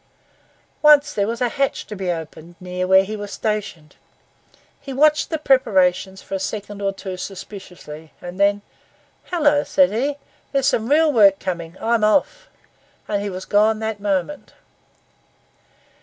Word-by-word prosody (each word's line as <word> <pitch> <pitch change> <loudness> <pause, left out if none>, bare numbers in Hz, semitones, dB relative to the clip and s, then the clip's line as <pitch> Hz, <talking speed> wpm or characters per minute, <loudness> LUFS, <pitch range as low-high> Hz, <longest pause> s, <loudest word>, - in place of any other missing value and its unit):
Once 295 -1 +6
there 200 -1 0
was 230 +2 -4
a 245 - +3
hatch 275 +3 -1
to 210 - -8
be 185 -2 -2
opened 165 0 -8
near 180 0 -4
where 190 +1 +6
he 215 +3 -5
was 205 -1 -7
stationed; 205 -8 -4 0.8
he 280 -1 -9
watched 300 +3 +3
the 320 - -1
preparations 190 - +2
for - - -10
a 195 - -1
second 205 +1 -5
or 195 0 0
so 190 -2 -6
suspiciously, 180 -5 -9
and 175 +2 -9
then, 200 0 +2 0.7
'Hullo,' 295 -4 +2
said 280 -1 +3
he, 275 +7 -1 0.3
'here's 275 -2 +1
some 230 -4 +1
real 305 +1 +4
work 200 -5 +6
coming—I'm 185 +6 -2
off,' 290 - +1 0.6
and 205 -1 -1
he 205 - -3
was 185 0 -7
gone 215 +2 +3
that 220 -1 -4
moment. 200 +8 -3
205 Hz, 150 wpm, -21 LUFS, 185-270 Hz, 0.8 s, Once